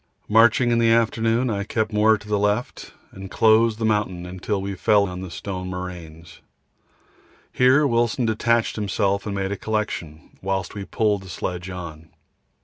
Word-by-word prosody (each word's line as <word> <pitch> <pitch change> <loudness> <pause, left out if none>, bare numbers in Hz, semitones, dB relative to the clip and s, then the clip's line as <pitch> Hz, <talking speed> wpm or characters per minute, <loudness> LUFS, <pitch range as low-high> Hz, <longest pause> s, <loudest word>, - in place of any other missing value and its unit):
Marching 120 +2 +4
in 115 - +2
the 115 -1 +3
afternoon, 115 +1 +1
I 100 -1 -2
kept 110 +1 -2
more 110 +1 +4
to 105 0 -15
the 105 -1 0
left, 105 +4 -2 0.2
and 95 0 -9
closed 110 +1 +3
the 110 - -2
mountain 95 -4 -2
till 105 +2 -2
we 100 +1 -4
fell 100 +1 +2
on 90 0 -6
the 95 - -7
stone 90 +1 -6
moraines. 85 -3 -8 1.1
Here 130 +4 +4
Wilson 120 -1 +1
detached 115 +1 +1
himself 100 -1 -1
and 100 - -3
made 95 0 -2
a 100 - -3
collection, 95 -8 -4
whilst 95 -2 -2
we 100 -1 -6
pulled 105 -2 0
the 95 - -12
sledge 90 +1 -5
on. 80 -4 -8
105 Hz, 165 wpm, -23 LUFS, 95-110 Hz, 1.1 s, Marching